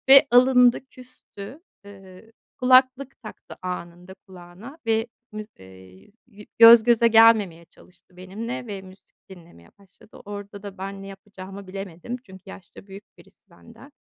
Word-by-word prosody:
ve 275 Hz, 0 st, +8 dB
alındı, 250 Hz, 0 st, +4 dB
küstü. 255 Hz, 0 st, -14 dB, 0.2 s
Iıı, 195 Hz, +2 st, -16 dB, 0.3 s
kulaklık 255 Hz, +1 st, +2 dB
taktı 215 Hz, -, -12 dB
anında 180 Hz, 0 st, -8 dB
kulağına 185 Hz, -, -14 dB
ve 225 Hz, +1 st, 0 dB, 0.3 s
müz 215 Hz, 0 st, -8 dB
eee, 95 Hz, -, -18 dB, 0.2 s
yü 210 Hz, -4 st, -16 dB
göz 230 Hz, 0 st, +9 dB
göze 235 Hz, -1 st, +3 dB
gelmemeye 220 Hz, -7 st, +4 dB
çalıştı 180 Hz, +1 st, -24 dB
benimle 220 Hz, +7 st, -7 dB
ve 200 Hz, -2 st, -8 dB
müzik 190 Hz, +1 st, -19 dB, 0.2 s
dinlemeye 165 Hz, -, -17 dB
başladı. 200 Hz, +2 st, -21 dB
Orada 205 Hz, 0 st, -10 dB
da 200 Hz, -2 st, -11 dB
ben 195 Hz, +1 st, -8 dB
ne -, -, -10 dB
yapacağımı 195 Hz, 0 st, -12 dB
bilemedim 195 Hz, +4 st, -8 dB
çünkü 190 Hz, -2 st, -16 dB
yaşça 195 Hz, +1 st, -15 dB
büyük 195 Hz, +1 st, -13 dB
birisi 195 Hz, -, -24 dB
benden. 230 Hz, +10 st, -18 dB
200 Hz, 135 wpm, -23 LUFS, 185-230 Hz, 0.3 s, göz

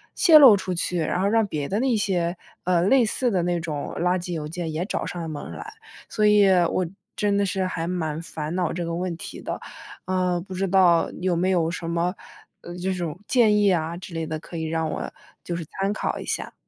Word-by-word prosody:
泄 325 Hz, -6 st, +7 dB
露 240 Hz, -8 st, +9 dB
出 190 Hz, -1 st, -3 dB
去， 175 Hz, +1 st, -2 dB
然 165 Hz, +3 st, 0 dB
后 200 Hz, -, +2 dB
让 225 Hz, 0 st, +3 dB
别 150 Hz, -7 st, -4 dB
的 205 Hz, +3 st, 0 dB
那 255 Hz, -2 st, +2 dB
些， 180 Hz, -4 st, 0 dB, 0.3 s
呃， 175 Hz, -1 st, +2 dB
类 240 Hz, +6 st, +4 dB
似 245 Hz, +3 st, 0 dB
的 185 Hz, -5 st, +1 dB
那 175 Hz, -1 st, 0 dB
种 155 Hz, -3 st, -4 dB
垃 180 Hz, +1 st, +2 dB
圾 175 Hz, 0 st, -5 dB
邮 150 Hz, -2 st, -4 dB
件 165 Hz, -1 st, -4 dB
也 165 Hz, +3 st, -1 dB
找 -, -, -3 dB
上 170 Hz, -2 st, -5 dB
门 145 Hz, -, -6 dB
来。 80 Hz, 0 st, -8 dB, 0.4 s
所 215 Hz, -, +1 dB
以 205 Hz, -2 st, +6 dB, 0.2 s
我 180 Hz, -2 st, 0 dB, 0.3 s
真 205 Hz, -1 st, +1 dB
的 200 Hz, -, +2 dB
是 190 Hz, 0 st, -1 dB
还 165 Hz, -2 st, -3 dB
蛮 160 Hz, -4 st, -2 dB
烦 155 Hz, -1 st, -5 dB
恼 180 Hz, -3 st, 0 dB
这 175 Hz, 0 st, -3 dB
个 170 Hz, 0 st, -3 dB
问 180 Hz, -1 st, -2 dB
题 200 Hz, -, -8 dB
的， -, -, -4 dB, 0.5 s
呃， 185 Hz, -1 st, 0 dB
不 190 Hz, +1 st, -9 dB
知 195 Hz, +1 st, -1 dB
道 180 Hz, -3 st, +4 dB
有 180 Hz, -2 st, +1 dB
没 180 Hz, +3 st, +1 dB
有 170 Hz, -3 st, +2 dB
什 165 Hz, 0 st, -5 dB
么， 170 Hz, +2 st, 0 dB, 0.5 s
呃， 175 Hz, -, -9 dB
这 190 Hz, +1 st, -1 dB
种 175 Hz, -1 st, -4 dB
建 220 Hz, -5 st, +4 dB
议 205 Hz, -2 st, +4 dB
啊 165 Hz, 0 st, -1 dB
之 180 Hz, -1 st, -10 dB
类 165 Hz, -1 st, -2 dB
的 155 Hz, -, -3 dB
可 170 Hz, -, -11 dB
以 160 Hz, -, -3 dB
让 160 Hz, 0 st, -1 dB
我， -, -, -4 dB, 0.3 s
就 175 Hz, -, -4 dB
是 170 Hz, -2 st, -5 dB
参 195 Hz, +5 st, -2 dB
考 -, -, -2 dB
一 -, -, -7 dB
下？ -, -, -3 dB
180 Hz, 250 characters per minute, -24 LUFS, 165-195 Hz, 0.5 s, 露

